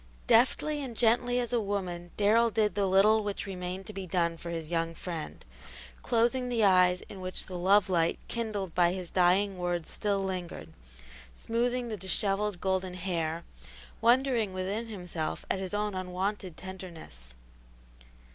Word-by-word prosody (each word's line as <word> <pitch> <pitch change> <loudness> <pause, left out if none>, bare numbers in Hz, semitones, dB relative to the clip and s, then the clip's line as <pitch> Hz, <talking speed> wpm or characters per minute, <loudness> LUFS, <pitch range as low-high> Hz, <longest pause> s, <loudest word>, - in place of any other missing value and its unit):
Deftly 290 +5 +3
and 240 -4 -7
gently 245 +1 +3
as 245 -1 -2
a 235 - +2
woman 185 -4 -3
Darrell 225 +3 +4
did 215 -3 +1
the 200 0 +1
little 210 +3 +5
which 205 -1 -3
remained 185 0 -5
to 215 - -8
be 195 -1 -6
done 170 -1 +1
for 170 +1 -8
his 165 -2 -4
young 165 0 -1
friend, 165 -3 -6 0.6
closing 245 +1 +1
the 235 -3 +1
eyes 180 -2 +5
in 195 - -10
which 185 0 -2
the 185 - -8
love 190 +3 +4
light 170 -3 +1
kindled 210 -6 -3
by 175 0 +3
his 185 -2 -5
dying 185 +2 +3
words 175 -2 -2
still 200 -2 0
lingered, 175 - -5 0.6
smoothing 240 - -1
the 215 - -3
dishevelled 195 +1 0
golden 190 -1 -1
hair, 170 -3 -2 0.6
wondering 235 -4 +3
within 195 +5 -3
himself 180 -7 -4
at 190 - 0
his 190 -1 -4
own 210 0 -1
unwonted 185 0 -3
tenderness. 170 - -9
190 Hz, 155 wpm, -29 LUFS, 180-215 Hz, 0.6 s, little